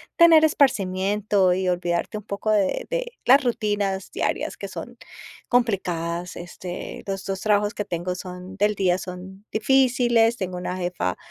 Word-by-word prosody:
tener 330 -2 +7
esparcimiento 200 -7 +2
y 185 0 -1
olvidarte 175 +3 -1
un 210 - -8
poco 200 +1 -4
de 200 -3 +1
de - - -2
la 255 - +8
rutinas 205 -7 -1
diarias, - - -2
que - - -7
son - - -8 0.5
complicadas. 180 -7 -1
Este, 175 +1 -7
los 195 -1 -4
2 195 -1 -3
trabajos 210 0 +2
que 210 - -3
tengo 175 +1 -3
son 180 +1 -8
del 210 +1 +1
día, 185 -2 +2
son 190 +2 -9
difíciles, 240 -1 +3
tengo 185 -2 -4
una 180 +1 -4
jefa 175 - -2
195 Hz, 150 wpm, -24 LUFS, 180-220 Hz, 0.5 s, la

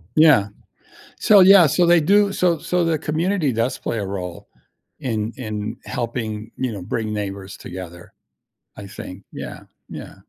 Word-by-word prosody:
Yeah. 150 -10 +5 0.7
So, 205 -2 +6
yeah, 185 -3 +8
so, 175 +5 +2
they 170 0 +5
do 200 +5 +3
so 175 -3 +2
so, 180 +3 -1
the 165 -1 +1
community 160 -2 0
does 115 +3 -1
play 115 - -3
a 100 - -3
role 90 -3 -6 0.5
in 110 -2 -2
in 110 -2 -5
helping, 115 -2 -4
you 130 -3 -2
know, 100 - -6
bring 110 +4 -3
neighbors 100 -1 -5
together, 85 -1 -9 0.6
I 100 - -8
think. 95 -1 -9
Yeah, - - -8 0.3
yeah. - - -9
115 Hz, 150 wpm, -21 LUFS, 100-165 Hz, 0.7 s, yeah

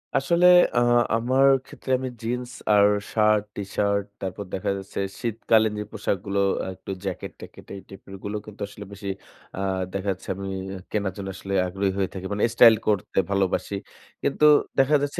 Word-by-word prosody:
আসলে 170 +6 +3 0.3
আ - - +6 0.4
আমার 130 +4 +3 0.2
ক্ষেত্রে 130 - -7
আমি 130 0 -3
জিন্স 125 +2 -3 0.2
আর 100 0 +6 0.3
শার্ট, 105 -1 +3
টিশার্ট 100 0 0 0.2
তারপর 95 +2 -4
দেখা 95 - -1
যাচ্ছে, 95 0 -7 0.2
শীতকালীন 110 -2 +2
যে - - -2
পোশাকগুলো 100 -2 -2 0.3
একটু 95 - -9
জ্যাকেট-ট্যাকেট 95 -3 -7
এই 100 - -8
টাইপের 95 0 -11
গুলো 105 +1 -3
কিন্তু 105 -2 -12
আসলে 100 0 -10
বেশি 100 0 -6 0.5
আ - - -3 0.3
দেখা 100 +1 -3
যাচ্ছে 90 - -13
আমি 100 +1 -6 0.4
কেনার 100 -3 -1
জন্য 100 -1 -5
আসলে 100 +1 -6
আগ্রহী 95 +2 -1
হয়ে 95 -2 0
থাকি। 95 -1 -7
মানে 105 - -1
স্টাইল 115 -1 +8
করতে 105 -3 +1
ভালোবাসি। 100 0 0 0.5
কিন্তু 145 +2 +2 0.3
দেখা 135 +3 +4
যাচ্ছে 145 0 -2
100 Hz, 160 wpm, -24 LUFS, 100-115 Hz, 0.5 s, স্টাইল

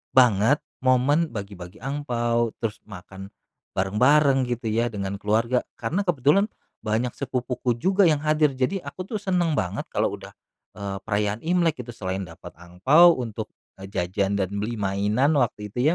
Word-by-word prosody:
banget 125 +2 +4 0.2
momen 130 +6 +3
bagi-bagi 100 -3 -8
angpao, 120 -5 -1
terus 110 -1 -2
makan 95 0 -10 0.5
bareng-bareng, 130 +7 +3
gitu 120 -2 -2
ya, 115 +2 +1
dengan 100 -2 -4
keluarga, 115 +4 +1 0.2
karena 180 - -2
kebetulan 160 - +3 0.3
banyak 110 +3 -1
sepupuku 125 -2 -2
juga 190 - +3
yang 150 -1 +1
hadir, 150 -2 +2
jadi 135 +10 0
aku 185 - -6
tuh 210 +2 -4
seneng 180 -4 0
banget 90 +2 -3
kalau - - 0
udah, - - -12 0.4
eee, 100 -1 -5
perayaan 105 +2 -1
Imlek 165 -6 +1
itu. 120 - -9
Selain 95 -3 -4
dapat 80 -3 -11
angpao 110 - +5
untuk 115 -4 -5 0.3
jajan 95 +1 -2
dan 95 0 -1
beli 115 +3 -3
mainan, 105 +9 +1
waktu 105 -4 -1
itu 130 +8 +2
120 Hz, 145 wpm, -24 LUFS, 100-145 Hz, 0.5 s, angpao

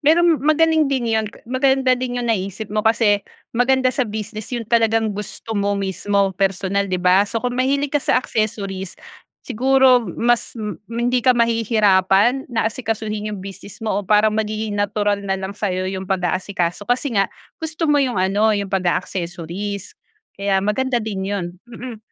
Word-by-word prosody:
Pero 315 +4 +4
magaling 315 -1 +3
din 250 -4 0
yun. 220 -1 +1 0.2
Maganda 260 +1 +2
din 250 -1 -3
yung 240 -1 -1
naisip 200 +1 -3
mo, 215 0 0
kasi 220 -3 +3 0.3
maganda 255 +2 +3
sa 255 -2 0
business 215 0 -6
yun 235 - -2
talagang 225 -1 +2
gusto 210 +2 -7
mo 200 0 +1
mismo, 195 +1 0
personal, 195 +1 0
'di 185 - 0
ba? 185 +3 +5
So 225 +1 -3
kung 250 0 -2
mahilig 275 +2 +1
ka 295 - +3
sa - - +1
accessories, 200 -6 -2 0.5
siguro 255 -1 +3
mas 235 +8 0
m 210 -3 -5
hindi 240 +2 0
ka 250 +1 +4
mahihirapan, 225 0 +3
na 225 -2 0
asikasuhin 215 -3 -3
yung 190 - -7
business 195 +2 -10
mo 210 -2 0
o 200 - -12
parang 215 +1 +4
magiging 215 -1 -2
natural 205 0 +1
na 190 - +1
lang 190 0 -4
sayo 185 -3 -2
yung 190 0 -5
pag-aasikaso 185 0 -1
kasi 245 -2 0
nga, 195 - +4 0.3
gusto 320 +1 -3
mo 290 - +4
yung 255 -5 +1
ano, 205 +4 +2
yung 200 -1 -3
pag-a-accessories. 185 +1 -3 0.4
Kaya 195 -1 +1
maganda 240 +3 0
din 195 -3 -3
yun. 200 -3 -2 0.2
Mm. 240 -1 -8
215 Hz, 165 wpm, -20 LUFS, 195-245 Hz, 0.5 s, ba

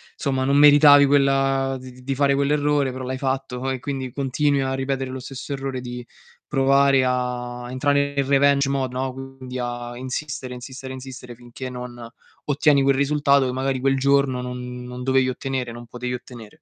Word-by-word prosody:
somma 135 -2 -1
non 140 +2 +2
meritavi 145 -1 +8
quella 135 -1 +2
di 130 0 -10
di 125 0 -16
di 135 +1 -2
fare 140 0 +3
quell'errore 145 -1 +1
però 130 0 -6
l'hai 130 0 -3
fatto 135 -1 -2
e 130 -1 -2
quindi 130 -1 -4
continui 140 +2 0
a 130 0 -1
ripetere 135 0 -2
lo 130 - -5
stesso 135 +2 -7
errore 135 -1 -4
di 125 -1 -7 0.4
provare 135 -1 +3
a 125 -1 -2
entrare 140 +2 +1
nel 140 -1 +1
revenge 140 0 +3
mode, 135 -2 -1
no, 130 0 -2
quindi 135 -1 -8
a 120 0 -4
insistere, 130 0 -5
insistere, 130 +1 -8
insistere 130 -1 -9
finché 120 +2 -9
non 125 -1 -8 0.4
ottieni 145 -1 +3
quel 135 0 +3
risultato, 140 -1 +3
che 125 - -2
magari 130 0 -1
quel 135 +1 +1
giorno 140 -1 +2
non 125 0 -6
non 125 0 -7
dovevi 130 0 +2
ottenere 130 -1 -3
non 120 +1 -10
potevi 125 +1 -4
ottenere. 125 +2 -12
130 Hz, 175 wpm, -23 LUFS, 125-140 Hz, 0.4 s, meritavi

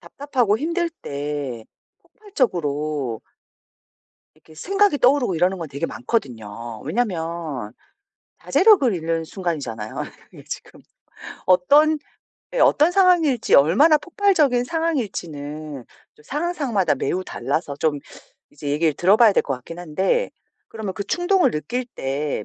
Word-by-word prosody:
답답하고 250 -7 -1
힘들 335 +4 -1
때 140 - -5 0.4
폭발적으로 150 - -2 1.2
이렇게 160 - -19
생각이 390 - +1
떠오르고 250 -6 +3
이러는 180 +3 +1
건 165 -2 -6
되게 140 +4 -3
많거든요. 115 - -4
왜냐하면 165 - -3 0.7
자제력을 375 - +4
잃는 165 -1 -2
순간이잖아요. 145 - -4 0.3
그게 - - -14
지금 - - -8 0.7
어떤 290 +13 +4 0.5
네 - - -1
어떤 315 +4 +4
상황일지 350 - +3
얼마나 210 - +6
폭발적인 315 -8 +2
상황일지는 155 - -4 0.3
또 - - -20
상황 300 - -2
상황마다 240 - 0
매우 185 +1 -2
달라서 140 +2 -3
좀 150 -2 +1 0.5
이제 145 - -7
얘기를 155 +2 +2
들어봐야 205 - +5
될 - - +3
것 135 - -2
같긴 130 +7 -10
한데 190 - 0 0.4
그러면 215 -4 -6
그 200 - -3
충동을 355 - +2
느낄 195 - -3
때 135 -3 -2
180 Hz, 295 characters per minute, -22 LUFS, -, 1.2 s, 얼마나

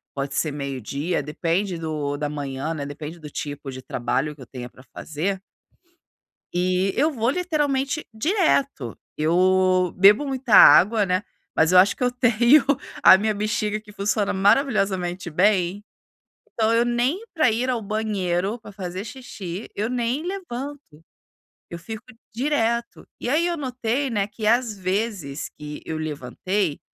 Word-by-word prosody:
pode 140 0 -3
ser 155 +1 0
12:00, 140 - -3
depende 170 +5 -1
do 150 -3 -3
da 150 0 -2
manhã, 145 +1 -4
né? 145 -3 -5
Depende 150 +3 -8
do 150 -2 -9
tipo 145 -3 -6
de 130 0 -9
trabalho 135 +6 -2
que 140 - -16
eu 125 - -11
tenha 125 -2 -7
pra 125 - -17
fazer. 185 +6 -3 1.1
E 185 +2 +1
eu 300 +4 +3
vou 235 -2 0
literalmente 295 -4 -1
direto. 280 - 0 0.2
Eu 185 +2 +3
bebo 205 +9 +6
muita 260 -5 0
água, 210 +2 +8
né? 185 +1 +1 0.3
Mas 160 +2 +3
eu 185 - +7
acho 190 +2 +5
que - - -1
eu 250 - +3
tenho 245 +3 +4 0.4
a 190 - +9
minha 215 +2 0
bexiga 210 0 -1
que 210 -1 -16
funciona 205 0 0
maravilhosamente 195 -5 +1
bem, 185 +2 +2 0.7
então 225 0 +2
eu 230 +1 +3
nem 240 - 0
pra 310 -8 +3
ir 240 +4 -1
ao 245 -3 0
banheiro, 205 -2 -1
pra 215 - -12
fazer 190 -1 -5
xixi, 210 -5 -7
eu 215 +3 -1
nem 250 +5 -1
levanto. 285 - -7 0.7
Eu 170 - -6
fico 210 +6 -8 0.3
direto. 235 -2 -1
E - - -3
aí 310 +5 +2
eu 345 - -1
notei, 255 -1 -2
né, 205 -4 0
que 215 +1 -4
às 235 -1 +2
vezes 185 -6 -3
que 150 0 -9
eu 160 - -4
levantei, 155 +4 -2
200 Hz, 150 wpm, -23 LUFS, 160-240 Hz, 1.1 s, a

